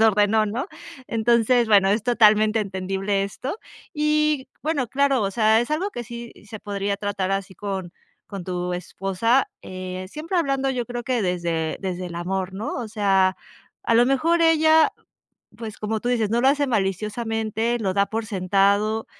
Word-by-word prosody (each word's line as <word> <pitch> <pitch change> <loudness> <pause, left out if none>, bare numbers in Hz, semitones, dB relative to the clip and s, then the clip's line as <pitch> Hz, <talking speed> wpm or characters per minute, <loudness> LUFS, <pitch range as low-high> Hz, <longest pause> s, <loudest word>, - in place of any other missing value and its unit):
desordenó", 215 0 +4
¿no?, 235 +9 -3 0.4
entonces, 235 +1 +2
bueno, 200 -2 +5
es 210 +1 +1
totalmente 215 -2 +4
entendible 195 0 -2
esto 260 - -5 0.3
y 300 -3 +1
bueno, 290 -5 -1
claro, 275 +1 +2
o 195 - 0
sea, 220 +1 +3
es 240 - -3
algo 360 +7 -1
que 240 - -6
sí, 235 +1 -8
se 215 0 -8
podría 200 -1 -3
tratar 205 -2 -2
así 195 0 -3
con 190 -4 -5 0.3
con 200 -3 -7
tu 180 0 -3
esposa, 195 +7 0
eh, 185 0 -6
siempre 330 - -3
hablando 275 -4 0
yo 245 -3 -2
creo 240 +1 -5
que 250 -1 -1
desde 170 -4 -1
desde 185 -1 -4
el 175 - -8
amor, 190 +2 -3
¿no?, 210 +4 -4
o 240 -4 -4
sea, 195 -3 +2 0.5
a 230 - +1
lo 240 +2 +5
mejor 325 +6 +2
ella, 320 -1 +5 0.7
pues, 220 -3 -7
como 215 +1 -2
tú 240 - -3
dices, 230 -4 +1
no 235 +2 +2
lo 265 - +4
hace 285 +1 +2
maliciosamente, 225 +2 -1
lo 195 -3 0
da 200 +1 +2
por 220 +2 -3
sentado, 200 +2 +1
215 Hz, 170 wpm, -23 LUFS, 195-245 Hz, 0.7 s, bueno